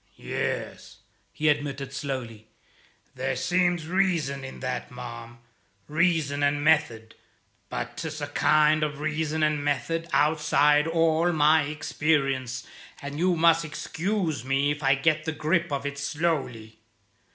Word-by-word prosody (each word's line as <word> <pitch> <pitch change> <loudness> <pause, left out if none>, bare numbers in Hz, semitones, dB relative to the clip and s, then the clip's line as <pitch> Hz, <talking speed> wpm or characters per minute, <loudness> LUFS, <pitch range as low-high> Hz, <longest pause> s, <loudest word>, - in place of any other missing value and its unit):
"Yes," - - -4 0.3
he 155 - -2
admitted 140 -2 -1
slowly, 125 -6 -5 0.7
"there - - -2
seems 175 -2 +1
reason 165 -7 0
in 135 - -8
that, 125 -1 -3
ma'am; 120 -1 -9 0.5
reason 155 -3 +1
and 145 0 +1
method. 145 -8 +1 0.6
But - - -5
'tis 155 -1 -5
a 145 - -2
kind 155 +1 +3
of 150 -1 -2
reason 155 +1 -1
and 150 -1 +1
method 165 +4 -1
outside 150 -1 +3
all 165 +1 +2
my 155 0 +4
experience, 135 -4 -1 0.3
and 145 +1 -6
you 180 +1 +2
must 165 0 +4
excuse 165 - -3
me 135 +2 +1
if 145 +1 -4
I 135 -1 +4
get 155 +3 +1
the 160 - -1
grip 165 +2 0
of 140 0 -2
it 140 0 -4
slowly. 135 -8 -2
150 Hz, 130 wpm, -26 LUFS, 140-160 Hz, 0.7 s, my